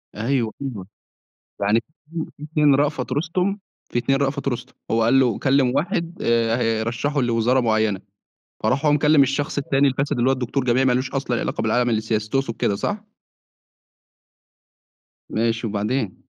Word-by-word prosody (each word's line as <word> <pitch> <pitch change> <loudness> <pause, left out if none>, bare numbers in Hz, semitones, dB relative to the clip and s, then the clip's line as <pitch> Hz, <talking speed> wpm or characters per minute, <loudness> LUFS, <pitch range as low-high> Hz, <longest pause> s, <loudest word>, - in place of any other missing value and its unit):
أيوه، 115 +1 0
أيوه. 115 -9 -5 0.7
يعني 105 +3 +3
في - - -31 0.3
2 165 -2 -4
في - - -15
2 150 -2 +3
رأفت 140 -2 0
رُستُم، 180 +7 0 0.3
في - - +1
2 135 +3 +1
رأفت 140 0 -1
رُستُم. 120 -3 -4 0.2
هو 115 0 +2
قال 135 +4 +4
له 120 -5 +2
كلّم 135 -2 +2
واحد 170 +3 -1
آآ 115 -1 +2
هيرشّحه 115 +5 0
لوزارة 120 +2 +2
معيّنة، 110 -4 +1 0.6
فراح 135 +4 +1
هو 150 - +5
مكلّم 150 0 +5
الشخص 140 +3 -1
التاني 140 0 +2
الفاسد 140 +1 -1
اللي 120 +2 +3
هو - - +4
الدكتور 130 +1 -2
جامعي 130 +1 +2
ما 130 - +3
لوش 130 +2 -1
أصلًا 130 -3 -1
علاقة - - -2
بالعالم 120 +2 +1
السياسي، 110 -1 -1
تقصد 135 -4 -1
كده 100 - 0
صح؟ 205 - -3 2.3
ماشي 115 +1 0
وبعدين؟ 105 0 -2
130 Hz, 160 wpm, -22 LUFS, 115-140 Hz, 2.3 s, هو